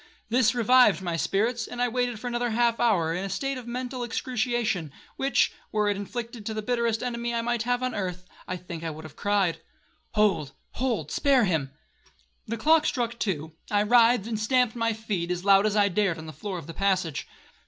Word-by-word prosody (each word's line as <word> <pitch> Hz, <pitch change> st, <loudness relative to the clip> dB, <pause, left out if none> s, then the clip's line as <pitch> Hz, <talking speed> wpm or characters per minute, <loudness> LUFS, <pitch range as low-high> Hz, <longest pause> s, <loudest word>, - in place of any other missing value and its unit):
This 245 Hz, 0 st, +3 dB
revived 240 Hz, -4 st, +5 dB
my 175 Hz, -2 st, -1 dB
spirits, 220 Hz, +8 st, 0 dB
and 245 Hz, -, -8 dB
I 245 Hz, -, +3 dB
waited 245 Hz, -2 st, -1 dB
for 250 Hz, -, -10 dB
another 245 Hz, 0 st, -1 dB
half 235 Hz, +1 st, +2 dB
hour 185 Hz, -9 st, +2 dB
in 180 Hz, +3 st, -2 dB
a 195 Hz, -, -3 dB
state 270 Hz, +7 st, -2 dB
of 240 Hz, -, -11 dB
mental 250 Hz, +1 st, -4 dB
excruciation, 235 Hz, -, -1 dB, 0.2 s
which, 270 Hz, +1 st, +2 dB, 0.2 s
were 210 Hz, -1 st, +1 dB
it 205 Hz, -, +1 dB
inflicted 225 Hz, +2 st, -5 dB
on 220 Hz, -, -4 dB
the 215 Hz, -, -3 dB
bitterest 235 Hz, -1 st, 0 dB
enemy 235 Hz, -1 st, -2 dB
I 235 Hz, +1 st, 0 dB
have 245 Hz, +1 st, 0 dB
on 255 Hz, -, -1 dB
earth, 180 Hz, -2 st, -4 dB, 0.2 s
I 185 Hz, -, -3 dB
think 170 Hz, -2 st, -8 dB
I 165 Hz, -, -2 dB
would 155 Hz, 0 st, -8 dB
have 155 Hz, -2 st, -11 dB
cried, 200 Hz, -4 st, +1 dB, 0.5 s
'Hold,—hold, 210 Hz, -, -1 dB
spare 275 Hz, -4 st, +3 dB
him.' 160 Hz, -7 st, 0 dB, 0.8 s
The 230 Hz, -, -3 dB
clock 315 Hz, +5 st, +4 dB
struck 235 Hz, -2 st, -2 dB
two,—I 165 Hz, +2 st, -2 dB
writhed 235 Hz, -1 st, +5 dB
and 225 Hz, -2 st, -3 dB
stamped 245 Hz, +1 st, +2 dB
with 240 Hz, -, -8 dB
my 230 Hz, 0 st, +1 dB
feet, 205 Hz, -6 st, -3 dB
as 180 Hz, +1 st, -3 dB
loud 200 Hz, +1 st, +6 dB
as 210 Hz, -, -1 dB
I 205 Hz, -1 st, +4 dB
dared, 195 Hz, -2 st, +1 dB
on 160 Hz, -, -8 dB
the 155 Hz, -, -8 dB
floor 185 Hz, +6 st, -5 dB
of 170 Hz, -, -8 dB
the 165 Hz, -, -8 dB
passage. 185 Hz, -5 st, 0 dB
220 Hz, 200 wpm, -26 LUFS, 185-240 Hz, 0.8 s, loud